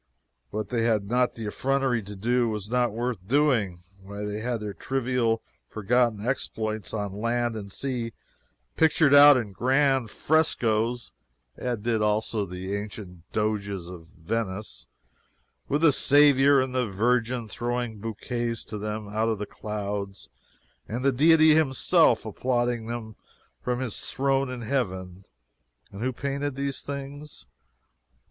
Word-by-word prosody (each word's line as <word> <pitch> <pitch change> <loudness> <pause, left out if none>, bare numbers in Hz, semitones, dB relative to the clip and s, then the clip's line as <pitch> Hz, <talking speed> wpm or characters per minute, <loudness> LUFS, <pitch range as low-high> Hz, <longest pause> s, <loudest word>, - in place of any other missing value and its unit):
What 110 +6 -4
they 120 -2 0
had 110 -3 +1
not 125 0 +2
the 115 - -6
effrontery 135 +2 0
to 105 0 -9
do, 120 +4 +1
was 105 -2 -4
not 120 0 +1
worth 120 0 -2
doing. 115 -10 +1 0.2
Why, 100 +2 -7
they 105 0 -3
had 120 +1 -2
their 105 -1 -5
trivial, 125 -2 -1 0.2
forgotten 110 0 +1
exploits 110 -4 -2
on 100 -3 -3
land 120 0 0
and 100 -2 -7
sea 120 -1 -3 0.6
pictured 155 -2 +4
out 145 -1 +9
in 110 -5 -3
grand 130 +3 +2
frescoes 120 -6 +1 0.4
(as 125 -1 -2
did 115 -1 0
also 105 0 0
the 90 +2 -4
ancient 100 -4 -8
Doges 100 -4 -2
of 85 -3 -10
Venice) 95 - -5 0.8
with 145 +3 0
the 165 - +7
Saviour 140 0 +5
and 130 -1 -1
the 125 -2 +1
Virgin 115 +3 0
throwing 120 0 -3
bouquets 115 +2 -3
to 105 - -7
them 105 0 -4
out 110 +2 0
of 110 - 0
the 105 - -4
clouds, 100 -2 -5 0.6
and 120 +4 -4
the 140 - +5
Deity 155 +3 +6
himself 150 -5 +3
applauding 120 -2 -2 0.5
from 125 0 -1
his 130 -5 -2
throne 135 0 0
in 125 -1 -6
Heaven! 95 -7 -3 0.7
And 100 - -9
who 130 +2 0
painted 140 +2 -3
these 140 -1 -2
things? 140 +1 -7
115 Hz, 140 wpm, -26 LUFS, 105-130 Hz, 0.8 s, out